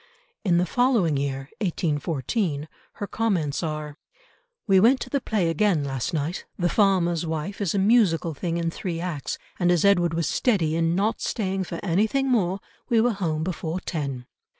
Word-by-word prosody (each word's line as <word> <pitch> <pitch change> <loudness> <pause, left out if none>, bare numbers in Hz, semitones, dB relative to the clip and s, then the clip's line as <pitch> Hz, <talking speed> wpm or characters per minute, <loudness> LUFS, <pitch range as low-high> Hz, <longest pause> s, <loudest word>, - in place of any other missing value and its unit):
In 180 -5 +3
the 180 - +3
following 225 - +2
year, 135 0 -3
1814, 160 - -1 0.3
her 205 - -5
comments 190 -10 -1
are, 155 -2 -4 0.7
"We 195 -3 +5
went 245 +6 +5
to - - -6
the 280 - +1
play 210 -8 0
again 165 -1 +2
last 135 +1 -2
night. 160 +2 -2
The 175 -2 +1
Farmer's 180 -5 +2
Wife 160 +6 -4
is 200 -2 0
a - - +2
musical 195 -6 +3
thing 170 +3 -2
in 170 -1 -1
three 170 -1 -4
acts, 170 -6 -3 0.2
and, 175 -1 +3
as 175 +1 +3
Edward 175 -4 +3
was 165 -1 0
steady 175 -11 +1
in 165 0 +1
not 205 +4 0
staying 195 -4 -1
for 170 - -5
anything 215 +9 +1
more, 195 -5 +1 0.3
we 230 - +4
were 235 +1 +3
home 160 -6 -1
before 170 0 -3
ten. 140 -8 -4
175 Hz, 175 wpm, -25 LUFS, 160-200 Hz, 0.7 s, We